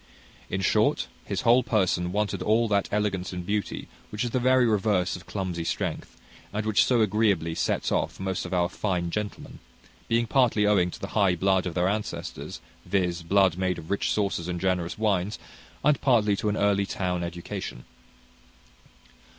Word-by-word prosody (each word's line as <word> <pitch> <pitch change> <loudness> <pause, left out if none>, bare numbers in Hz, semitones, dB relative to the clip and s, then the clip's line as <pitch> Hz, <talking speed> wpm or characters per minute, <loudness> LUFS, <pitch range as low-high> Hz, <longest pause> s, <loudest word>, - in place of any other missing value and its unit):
In 95 - -2
short, - - +2 0.2
his - - -2
whole 120 +2 +5
person 95 -6 +1
wanted 105 +1 -1
all 115 +2 +2
that 100 -2 +1
elegance 100 -3 -1
and 90 -1 -5
beauty 105 +2 -2 0.2
which 105 +3 -3
is 120 - -2
the 130 - +1
very 130 0 +4
reverse 105 -4 +1
of 90 - -11
clumsy 90 -4 -3
strength, - - -3 0.3
and 105 +1 -3
which 110 -2 +4
so 120 -3 +3
agreeably 100 -6 +2
sets - - -1
off - - -1
most 95 -1 -2
of 90 - -7
our 90 -1 +2
fine 90 -3 -2
gentlemen; 105 +1 -5 0.5
being 115 +1 +2
partly 115 -4 +3
owing 95 -4 +3
to - - -9
the 100 - -6
high 100 -4 +3
blood 95 +1 +2
of 85 - -5
their 90 0 +2
ancestors, 105 +2 -4 0.2
viz., 90 -3 0
blood 95 0 +3
made 95 -1 0
of 80 +1 -9
rich 100 - 0
sauces 100 -5 -1
and 90 -1 -3
generous 90 -1 -1
wines, 105 -1 0 0.5
and 150 -2 +3
partly 110 -6 +3
to 105 - -1
an 105 - -1
early 100 -1 +2
town 90 -2 -2
education. 85 -7 -6
100 Hz, 175 wpm, -26 LUFS, 90-105 Hz, 0.5 s, whole